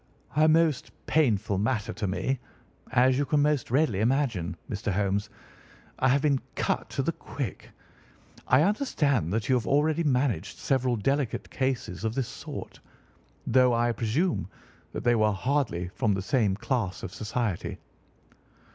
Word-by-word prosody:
"A 155 Hz, +1 st, +5 dB
most 160 Hz, -3 st, +3 dB, 0.2 s
painful 110 Hz, -10 st, +2 dB
matter 110 Hz, +1 st, -1 dB
to 105 Hz, +2 st, -3 dB
me, 125 Hz, +7 st, -1 dB, 0.5 s
as 130 Hz, +1 st, +4 dB
you -, -, +3 dB
can 145 Hz, 0 st, +2 dB
most 150 Hz, -3 st, +1 dB
readily 130 Hz, -6 st, +2 dB
imagine, 115 Hz, -, 0 dB
Mr. 105 Hz, +1 st, -3 dB
Holmes. 100 Hz, +2 st, 0 dB, 0.7 s
I 130 Hz, -, +3 dB
have 140 Hz, +2 st, +3 dB
been 140 Hz, -3 st, +2 dB
cut -, -, -1 dB
to -, -, -2 dB
the -, -, +1 dB
quick. -, -, -6 dB, 0.8 s
I 130 Hz, +4 st, +5 dB
understand 150 Hz, -, +1 dB
that 105 Hz, 0 st, -1 dB
you -, -, +3 dB
have 120 Hz, -4 st, +1 dB
already 155 Hz, +3 st, +2 dB
managed 125 Hz, -, 0 dB
several 130 Hz, -2 st, +1 dB
delicate 135 Hz, +3 st, -1 dB
cases 130 Hz, -8 st, -2 dB
of 110 Hz, 0 st, -1 dB
this 135 Hz, -3 st, -1 dB
sort, -, -, -8 dB
sir, -, -, -25 dB, 0.6 s
though 125 Hz, 0 st, +4 dB
I 120 Hz, +1 st, +2 dB
presume 120 Hz, -, 0 dB, 0.4 s
that -, -, -5 dB
they 120 Hz, -, +4 dB
were 110 Hz, -2 st, +3 dB
hardly 100 Hz, -7 st, -1 dB
from 105 Hz, +1 st, 0 dB
the 95 Hz, -, -3 dB
same 105 Hz, -4 st, +2 dB
class 105 Hz, -3 st, -2 dB
of 95 Hz, -, -6 dB
society." 110 Hz, -3 st, -2 dB
125 Hz, 155 wpm, -27 LUFS, 105-140 Hz, 0.8 s, A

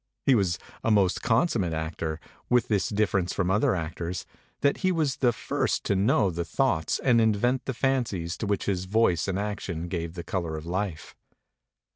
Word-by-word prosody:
He 135 Hz, -, +5 dB
was 95 Hz, -7 st, +2 dB, 0.3 s
a -, -, +1 dB
most 100 Hz, -4 st, +3 dB
consum 120 Hz, +3 st, +2 dB
mate 85 Hz, -3 st, -1 dB
actor, 80 Hz, 0 st, -3 dB, 0.3 s
with 125 Hz, -1 st, +3 dB
this 100 Hz, -4 st, +1 dB
difference 100 Hz, -4 st, +1 dB
from 95 Hz, -1 st, 0 dB
other 100 Hz, -1 st, +3 dB
actors, 85 Hz, +1 st, -4 dB, 0.4 s
that 140 Hz, -, +3 dB
he 185 Hz, -1 st, +1 dB
was 155 Hz, -6 st, 0 dB
the 125 Hz, -2 st, +3 dB
first 115 Hz, -, -1 dB
to 100 Hz, -, +1 dB
know 100 Hz, -1 st, +3 dB
the 85 Hz, 0 st, -2 dB
thoughts 85 Hz, -, 0 dB
and 120 Hz, -3 st, +3 dB
invent 115 Hz, +4 st, +2 dB
the 135 Hz, -, -3 dB
fancies 115 Hz, -11 st, 0 dB
to 110 Hz, -, -3 dB
which 100 Hz, -1 st, 0 dB
his 95 Hz, -2 st, -1 dB
voice 95 Hz, -5 st, +2 dB
and 95 Hz, -1 st, -1 dB
action 100 Hz, -5 st, -3 dB
gave 85 Hz, -1 st, -4 dB
the 85 Hz, -, -5 dB
color 85 Hz, -3 st, -3 dB
of 80 Hz, -, -8 dB
life. 90 Hz, -2 st, -3 dB
100 Hz, 185 wpm, -27 LUFS, 85-115 Hz, 0.4 s, He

